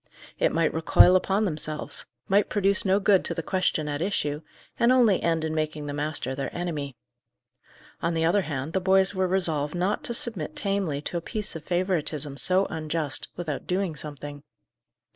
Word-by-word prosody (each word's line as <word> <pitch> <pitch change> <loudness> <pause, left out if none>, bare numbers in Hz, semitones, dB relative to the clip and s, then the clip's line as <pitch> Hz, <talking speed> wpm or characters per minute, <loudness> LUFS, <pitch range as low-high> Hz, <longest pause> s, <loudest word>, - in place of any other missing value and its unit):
It - - +3
might 165 -1 +1
recoil 165 +3 +5
upon 195 +3 +2
themselves; 155 -3 0 0.2
might 200 +1 +3
produce 200 -1 +2
no 195 +1 +3
good 195 -2 +3
to - - -2
the 165 - -3
question 180 -4 0
at 145 +1 -3
issue, 150 -6 -1 0.4
and 235 +1 +4
only 235 -7 +4
end 165 -1 0
in 160 - -2
making 155 -1 -2
the 145 - -4
master 145 -3 -2
their 135 +1 -4
enemy. 150 -7 -4 1.0
On 170 0 0
the 165 0 +1
other 180 +5 +3
hand, 145 -2 -4
the 190 - 0
boys 190 +1 +3
were 185 -1 0
resolved 165 -5 -1
not 185 +4 -1
to 235 - -1
submit 185 -11 -4
tamely 195 -8 -1
to 175 - -3
a - - -3
piece 210 0 -1
of 160 - -7
favouritism 165 -6 -1
so 185 +5 +3
unjust, 155 -2 -2
without 155 -5 -4
doing 180 -3 -1
something. 145 -1 -8
165 Hz, 180 wpm, -26 LUFS, 150-190 Hz, 1.0 s, recoil